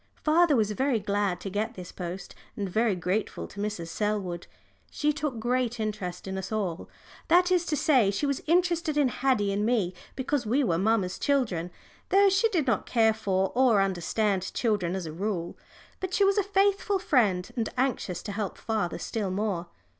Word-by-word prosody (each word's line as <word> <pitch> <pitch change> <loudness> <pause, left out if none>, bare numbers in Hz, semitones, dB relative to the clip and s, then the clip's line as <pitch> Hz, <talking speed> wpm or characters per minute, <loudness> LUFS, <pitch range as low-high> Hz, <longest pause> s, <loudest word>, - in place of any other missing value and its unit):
Father 320 0 +4
was 215 -3 +2
very 260 +2 +1
glad 200 -3 -1
to 195 - -4
get 220 +4 -2
this 180 -2 -8
post, 180 +1 -6 0.2
and 200 - -2
very 220 +2 +1
grateful 180 +4 -2
to 205 - -11
Mrs. 205 -5 -3
Selwood. 195 -3 -2 0.4
She 300 0 0
took 295 -4 -3
great 245 0 0
interest 200 -5 -4
in 190 0 -3
us 190 - -6
all 190 -6 -3 0.4
that 360 +2 +4
is 350 -2 +2
to 300 - 0
say, 255 -11 +4
she 200 +9 -1
was 280 -1 -1
interested 340 -2 +2
in 285 -3 +4
Haddie 245 -6 +1
and 205 +1 0
me 215 -6 +1 0.2
because 270 0 -1
we 250 +6 +1
were 170 -8 +1
mamma's 195 -3 +1
children, 220 -12 0 0.4
though 395 +1 +5
she 390 +4 +3
did 340 -9 0
not 235 -7 0
care 225 -2 +3
for 195 -3 0
or 245 -4 +4
understand 195 +1 0
children 205 -7 0
as 190 -2 -4
a 155 - -6
rule. 180 -1 -3 0.4
But 375 -1 -3
she 400 - +3
was 395 +1 +3
a - - +2
faithful 400 +1 +2
friend, 220 - +1
and 230 -3 -1
anxious 245 -9 -1
to 205 - -5
help 200 -2 -4
father 215 -6 -2
still 210 -4 -3
more. 185 -3 -2
215 Hz, 185 wpm, -27 LUFS, 190-280 Hz, 0.4 s, though